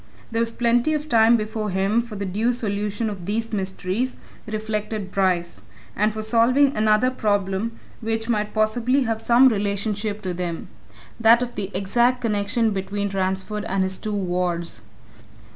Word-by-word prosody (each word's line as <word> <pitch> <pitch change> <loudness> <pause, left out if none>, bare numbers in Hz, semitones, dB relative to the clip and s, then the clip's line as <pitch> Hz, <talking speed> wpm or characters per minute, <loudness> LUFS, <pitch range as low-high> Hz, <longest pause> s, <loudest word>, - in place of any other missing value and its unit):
There 225 - -1
was 230 0 +1
plenty 240 +6 +2
of 300 0 -3
time 230 -3 +5
before 215 0 -3
him 195 +4 +1
for 235 -2 -9
the 200 0 -3
due 215 +6 0
solution 210 -1 -2
of 195 -4 -6
these 225 +2 -2
mysteries, 195 +5 -2 0.3
reflected 215 -2 -3
Bryce 180 -3 0 0.3
and 210 +2 +2
for 215 0 -5
solving 250 +5 +3
another 215 +4 +3
problem 205 -1 -1 0.2
which 225 0 -2
might 210 -3 0
possibly 235 +5 +1
have 225 -2 -1
some 245 +3 +6
relationship 205 -1 -1
to 185 -1 -2
them 175 -1 -4 0.5
that 230 +2 +6
of 245 - -5
the 200 -2 -4
exact 240 +6 +2
connection 220 +1 +1
between 200 +1 -2
Ransford 190 +2 -2
and 195 -2 0
his 190 0 -3
two 215 - -4
wards. 175 - -2
215 Hz, 155 wpm, -23 LUFS, 195-230 Hz, 0.5 s, some